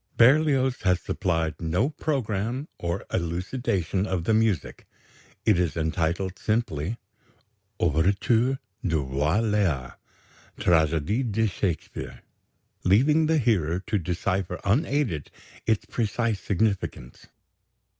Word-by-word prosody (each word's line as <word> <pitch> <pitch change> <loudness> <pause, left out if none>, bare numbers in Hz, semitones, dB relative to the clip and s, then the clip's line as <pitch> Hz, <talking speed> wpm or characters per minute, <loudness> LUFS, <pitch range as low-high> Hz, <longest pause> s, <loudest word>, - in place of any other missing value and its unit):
Berlioz 135 0 +4
has 90 -2 +2
supplied 80 -5 -1
no 90 - +1
programme 125 -3 -2
or 85 0 -3
elucidation 95 +2 -1
of 90 -3 -1
the 110 - +1
music. 110 -8 0 0.6
It 105 -5 +4
is 85 -4 0
entitled 85 +3 -1
simply, 105 -3 -1 0.8
Ouverture 100 - +2 0.3
du 80 -5 +1
Roi 75 +9 +1
Léar 95 - 0 0.6
(Tragédie 85 - +2
de 110 +2 +2
Shakespeare), 95 -4 -3 0.6
leaving 150 - +4
the 160 0 +3
hearer 95 - +1
to 105 - 0
decipher 90 +2 -2
unaided 120 - +1 0.4
its 110 -2 +1
precise 115 -1 -1
significance. 100 - -2
100 Hz, 100 wpm, -26 LUFS, 85-115 Hz, 0.8 s, Berlioz